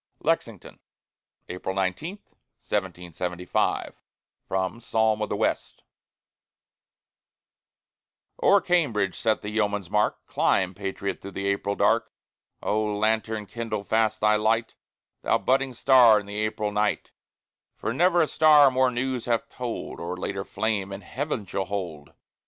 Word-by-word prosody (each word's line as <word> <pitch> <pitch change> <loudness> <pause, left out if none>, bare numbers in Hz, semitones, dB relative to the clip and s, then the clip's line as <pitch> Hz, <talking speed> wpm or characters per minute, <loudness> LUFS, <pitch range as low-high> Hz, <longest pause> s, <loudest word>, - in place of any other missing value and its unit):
LEXINGTON - - -2 0.7
[April 90 +1 -5
19, 95 - -2 0.4
1775] 90 -2 -2 0.5
From 95 +4 -2
"Psalm 110 -2 +1
of 105 - -1
the - - -1
West" - - -2 2.6
O'er 200 - +6
Cambridge 120 - +1
set 110 -1 0
the 105 - -4
yeoman's 105 -3 -1
mark: 105 +1 0
Climb, 95 -1 +1
patriot, 100 0 -4
through 100 - -7
the 95 - -4
April 100 0 0
dark. - - +2 0.5
O 110 +1 +1
lanthorn! 110 +1 0
kindle 110 -1 -4
fast 110 +1 +1
thy 105 0 +4
light, 110 +2 +1 0.5
Thou - - +2
budding 130 0 0
star 120 -4 +6
in 105 - -9
the 105 +1 -5
April 110 -1 -1
night, 105 0 -1 0.6
For 110 - -3
never 175 +4 +4
a - - 0
star 150 -3 +6
more 130 0 +3
news 125 0 -2
hath 115 -2 -1
told, 125 -2 -5
Or 85 +2 -4
later 95 +1 -3
flame 105 -2 -2
in 100 +1 -6
heaven 130 -2 -4
shall 95 0 -3
hold. 90 -7 -5
105 Hz, 130 wpm, -26 LUFS, 100-120 Hz, 2.6 s, O'er